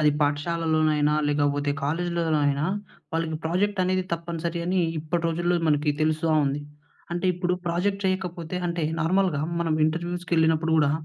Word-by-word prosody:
అది 150 -1 +5
పాఠశాలలోనైనా, 155 0 +1 0.2
లేకపోతే 145 0 +1
కాలేజీలో 170 +3 -1 0.2
అయినా 140 +1 +1 0.5
వాళ్ళకి 165 -1 -1
ప్రాజెక్ట్ 190 +5 0
అనేది 185 0 +1
తప్పనిసరి 170 0 -3
అని 185 +1 +2 0.2
ఇప్పటి 160 +2 -2
రోజుల్లో 175 +2 0
మనకి 150 0 +2
తెలుస్తా 155 +1 +1
ఉంది. 140 +2 -1 0.5
అంటే 175 +2 -1
ఇప్పుడు 180 0 -1
ప్రాజెక్ట్ 195 +4 0
చేయకపోతే 180 -2 -2
అంటే 170 -1 -2 0.2
నార్మల్‍గా 180 -2 +2 0.2
మనం 165 -2 +1
ఇంటర్వ్యూస్‌కెళ్ళినప్పుడు 165 -1 +1
కూడా 145 -2 +4
165 Hz, 130 wpm, -25 LUFS, 155-175 Hz, 0.5 s, అది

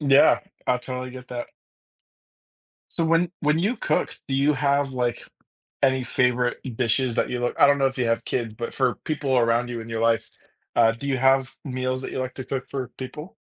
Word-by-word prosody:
Yeah, 140 -2 +5 0.3
I 125 - +2
totally 125 0 -5
get 125 0 -10
that. 120 -1 -4 1.4
So 165 - 0
when 165 +1 +2
when 150 +2 +2
you 210 +8 +1
cook, 155 - -1
do 135 - -1
you 140 +2 +3
have, 140 -1 +1
like, 120 -2 -2 0.6
any 130 -1 +3
favorite 125 -1 +1 0.2
dishes 120 0 +1
that - - +1
you 125 -1 -2
look 120 - -1
I - - +8
don't 140 0 +5
know 135 - +3
if 135 0 -2
you 120 - +1
have 115 0 0
kids, 115 -4 -2
but 115 +1 -5
for 125 -6 +1
people 140 -4 0
around 120 +1 +2
you 120 -1 -4
in 115 - -9
your 115 -1 -3
life, 115 -1 +2 0.5
uh, 115 -1 +6
do 130 +5 -7
you 135 -2 0
have 135 0 +3
meals 130 -1 -2
that - - -5
you - - -3
like 130 0 -4
to 130 - -6
cook 135 0 -4
for 130 -3 -4
people? 150 +7 -7
130 Hz, 210 wpm, -24 LUFS, 120-140 Hz, 1.4 s, I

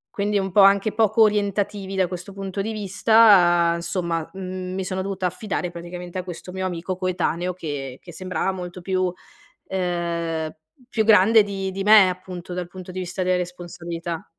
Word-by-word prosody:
Quindi 205 0 +1
un 190 -1 -2
po' 205 - +6
anche 200 +2 +5
poco 220 0 +4
orientativi 205 -1 0
da 185 -1 +3
questo 180 +2 -7
punto 195 0 -4
di 220 +3 -3
vista, 195 -4 +5
insomma, 170 -1 -2
mhmm, 185 -1 -5
mi 190 0 -3
sono 185 0 -2
dovuta 190 -1 -3
affidare 180 -1 -3
praticamente 175 +1 -8
a - - -4
questo 180 0 -8
mio 190 0 -3
amico 180 +1 -3
coetaneo 180 -1 -1
che 140 -6 -6
che 175 - -12
sembrava 185 +2 -2
molto 180 -1 -7
più 185 0 0 0.6
ehm, 170 -3 -2 0.3
più 220 -4 +1
grande 220 +1 +6
di 195 -1 -4
di 195 +1 -4
me 210 -1 +8
appunto, 180 -1 -7
dal 180 -1 -4
punto 185 0 -9
di 185 - -4
vista 185 +1 -3
delle 185 0 +2
responsabilità. 175 -1 -5
185 Hz, 170 wpm, -23 LUFS, 175-195 Hz, 0.6 s, me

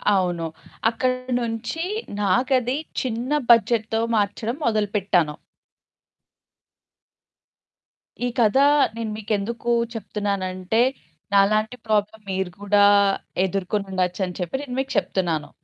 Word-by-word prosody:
అవును. 175 -3 0 0.4
అక్కడి 255 +2 -1
నుంచి 235 +7 -3 0.4
నాకది 250 +5 +2 0.2
చిన్న 245 +1 -3 0.2
బడ్జెట్‌తో 225 -1 +3
మార్చడం 215 +4 -1
మొదలుపెట్టాను. 200 -7 +1 2.9
ఈ - - +1
కథ 225 +1 +4 0.4
నేను 230 -2 -3
మీకెందుకు 220 +2 -2 0.2
చెప్తున్నానంటే 200 -1 -1 0.5
నాలాంటి 215 +3 +3
ప్రాబ్లమ్ 215 0 0
మీరు 190 -1 -2
కూడా 205 0 +4 0.6
ఎదుర్కొని 195 +2 -2
ఉండొచ్చని 180 0 -1
చెప్పి 180 +3 -3
నేను 250 -3 -6
మీకు 270 0 -2
చెప్తున్నాను. 175 -6 -1
210 Hz, 90 wpm, -23 LUFS, 190-235 Hz, 2.9 s, కథ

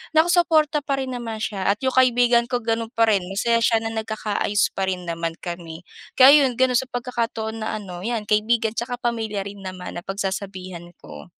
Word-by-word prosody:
nakasuporta 320 -2 +3
pa 275 -1 -1
rin 260 - -4
naman 230 -3 -5
siya 200 -3 -3
at 210 - -15
'yong 260 -1 -1
kaibigan 245 -2 +4
ko 245 -1 -1
ganun 225 +1 -2
pa 230 -2 +3
rin 195 -4 +2
masaya 210 +5 +1
siya 225 -1 +2
na 225 - -3
nagkakaayos 215 -2 -1
pa 195 - +1
rin 180 -2 -3
naman 165 0 -3
kami 170 -2 -7 0.4
kaya 275 +2 +8
yun 255 - 0
gano'n 255 -1 +3
sa 265 - 0
pagkakataon 230 -3 -3
na, - - -3
ano 180 -2 -8
'yan 225 -3 -3
kaibigan 220 +1 +1
at - - +3
saka 250 - -6
pamilya 225 -4 -2
rin 200 0 -9
naman 185 -1 -7
na 175 - -8
pagsasabihan 190 -3 -5 0.2
ko. 75 -1 -11
220 Hz, 195 wpm, -22 LUFS, 195-245 Hz, 0.4 s, kaya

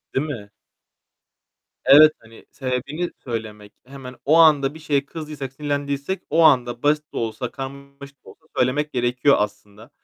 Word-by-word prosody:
Değil 135 - +1
mi? 110 -9 -7 1.4
Evet, 155 +2 +8
hani, 115 0 -17
sebebini 140 +6 -3
söylemek. 110 -4 -6
Hemen 130 -1 -10
o 155 +3 +4
anda 150 -4 +5
bir 160 - -12
şeye 145 -3 -1
kızdıysak, 150 -4 -7
sinirlendiysek 145 +4 -3
o 160 +3 +2
anda 120 -5 +3
basit 150 +1 0
de - - -6
olsa 115 +2 -3
karmaşık 140 +1 -10
da - - -13
olsa 160 - -19
söylemek 145 +4 0
gerekiyor 125 +3 +2
aslında. 105 +1 -5
140 Hz, 145 wpm, -22 LUFS, 120-150 Hz, 1.4 s, Evet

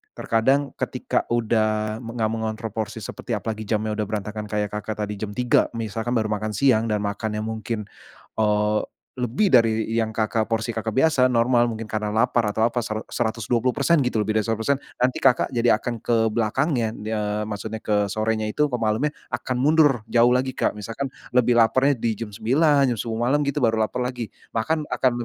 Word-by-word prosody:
terkadang 135 +5 +1
ketika - - -1
udah 110 -2 0
enggak 115 -2 -2
mengontrol 110 0 -3
porsi 110 +1 -4
seperti 115 +4 -4
apalagi 110 0 -4
jamnya 110 0 0
udah 105 - -1
berantakan 105 0 -4
kayak, 105 -1 -2
Kakak, 105 0 -4
tadi 105 -1 -5
jam 105 -1 -5
3.00 125 +1 +3
misalkan 115 +2 -3
baru 110 -2 0
makan 105 0 -2
siang 115 -1 +3
dan 105 -2 -1
makannya 105 +1 -2
mungkin, 110 0 -4 0.6
eee, 105 0 +2 0.4
lebih 125 - 0
dari 115 - +3
yang, 110 -1 0
Kakak 110 0 0
porsi, 115 0 -1
Kakak, 110 0 -2
biasa 135 -2 +4
normal, 120 0 +3
mungkin 110 0 -6
karena 105 -1 -2
lapar 115 -1 +2
atau 110 +2 +2
apa 120 0 -2
sera 110 0 -3
seratus 110 -3 -2
dua 120 -2 +1
puluh 125 - +3
persen 160 +4 +3
gitu, 125 -3 0
lebih 110 +1 +1
dari - - 0
100%, 115 +5 +1 0.2
nanti, 125 +1 +1
Kakak, 130 0 +3
jadi 120 0 +3
akan 120 -1 -4
ke 120 - 0 0.2
belakangnya. 115 +2 0
Eee, 105 -1 -2
maksudnya 110 +1 -5
ke 105 -1 +1
sorenya 110 +1 0
itu, 150 +8 +1
kemalemnya 120 +4 0 0.2
akan 130 - -2
mundur 145 -4 +4
jauh 120 +1 +4
lagi, 130 +1 0
Kak. - - 0
Misalkan 115 +6 -4 0.3
lebih 120 -1 +4
lapernya 130 +5 +4
di 115 -1 -1
jam 105 0 -6
9.00, 135 +6 +3
jam - - -11
10.00 115 +1 -2
malem 145 +3 +2
gitu 140 +1 0
baru 110 -1 +3
laper 115 +3 -3
lagi. 125 -2 -3 0.3
Makan 150 +7 0
akan 130 - +1
115 Hz, 185 wpm, -23 LUFS, 110-125 Hz, 0.6 s, biasa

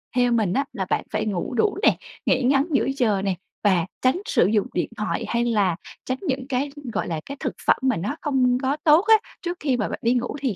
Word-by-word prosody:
theo 245 -1 +3
mình 215 -6 +2
á 275 +5 +1
là 190 - -2
bạn - - +1
phải - - -1
ngủ 200 -1 -2
đủ 405 - +1
nè, - - +5 0.3
nghỉ 260 - +2
ngắn 275 +2 +3
giữa 275 - +2
giờ 210 -6 +2
nè 195 -2 0 0.3
và 185 -5 +3 0.2
tránh 260 +9 +2
sử - - +3
dụng 210 -1 +1
điện 175 - -1
thoại 210 - -2
hay 235 0 0
là 205 -7 +2 0.3
tránh 255 0 -2
những 265 -6 -2
cái, 275 +2 -1 0.2
gọi - - -1
là, 165 -3 -2
cái 280 0 -7
thực - - -2
phẩm - - +5
mà 260 -6 +1
nó 205 - -3
không 255 -4 +2
có 270 +2 0
tốt 310 +2 +6
á, 445 - +8 0.3
trước 350 0 -3
khi 270 -4 0
mà 215 - -1
bạn - - -5
đi 235 +1 +3
ngủ 250 +2 -1
thì 260 -8 -1
250 Hz, 245 wpm, -23 LUFS, 210-275 Hz, 0.3 s, á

